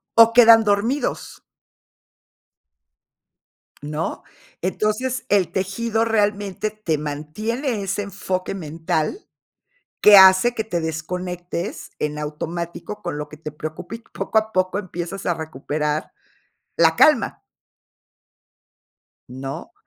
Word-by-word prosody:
o 230 Hz, 0 st, +7 dB
quedan 230 Hz, -1 st, +8 dB
dormidos. 220 Hz, +7 st, -1 dB, 2.4 s
¿No? 150 Hz, +2 st, -4 dB, 0.4 s
Entonces, 215 Hz, +7 st, -1 dB
el 200 Hz, -3 st, +2 dB
tejido 220 Hz, +4 st, -1 dB
realmente 205 Hz, -2 st, 0 dB
te 205 Hz, -8 st, -2 dB
mantiene 210 Hz, -, -3 dB
ese 195 Hz, +1 st, -2 dB
enfoque 195 Hz, -2 st, -3 dB
mental 160 Hz, -, -3 dB, 0.8 s
que 210 Hz, -1 st, +9 dB
hace 190 Hz, +5 st, +7 dB
que 220 Hz, -, -2 dB
te 175 Hz, -6 st, -2 dB
desconectes 175 Hz, +3 st, -4 dB
en 150 Hz, 0 st, -3 dB
automático 170 Hz, +6 st, -5 dB
con -, -, -4 dB
lo 150 Hz, 0 st, -5 dB
que 155 Hz, 0 st, -12 dB
te 155 Hz, -1 st, -7 dB
preocupa 155 Hz, +6 st, -7 dB
y 230 Hz, -, -12 dB
poco 220 Hz, -, -1 dB
a 220 Hz, 0 st, +2 dB
poco 185 Hz, 0 st, 0 dB
empiezas 185 Hz, -1 st, -5 dB
a 175 Hz, -, +2 dB
recuperar 150 Hz, -1 st, -3 dB, 0.6 s
la -, -, +4 dB
calma. -, -, +4 dB, 1.9 s
¿No? 135 Hz, +2 st, -7 dB
185 Hz, 105 wpm, -22 LUFS, 155-215 Hz, 2.4 s, que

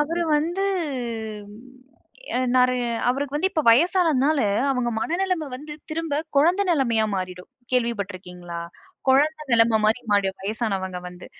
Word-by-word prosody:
அவரு 335 Hz, +4 st, 0 dB
வந்து 345 Hz, +6 st, -1 dB, 1.7 s
எ -, -, +2 dB, 0.2 s
நிற 255 Hz, 0 st, +5 dB, 0.4 s
அவருக்கு 275 Hz, +2 st, -1 dB
வந்து 370 Hz, +6 st, +1 dB
இப்ப 315 Hz, -5 st, 0 dB
வயசானதுனால, 310 Hz, 0 st, +3 dB, 0.3 s
அவங்க 250 Hz, -3 st, 0 dB
மனநிலம 350 Hz, 0 st, -1 dB
வந்து 300 Hz, +2 st, -9 dB, 0.2 s
திரும்ப 310 Hz, -2 st, -1 dB, 0.2 s
குழந்த 345 Hz, +8 st, +4 dB
நிலமையா 235 Hz, -9 st, +2 dB
மாறிடும். 180 Hz, -1 st, -6 dB, 0.2 s
கேள்விப்பட்ருக்கிங்களா? 185 Hz, -7 st, -3 dB, 0.5 s
குழந்த 305 Hz, +4 st, +3 dB
நிலம 230 Hz, -1 st, +4 dB
மாரி 220 Hz, +3 st, +2 dB
மாறிடும்ங்க 195 Hz, -2 st, 0 dB
வயசானவங்க 195 Hz, -4 st, -2 dB
வந்து. 180 Hz, 0 st, -12 dB
255 Hz, 115 wpm, -24 LUFS, 205-310 Hz, 1.7 s, நிற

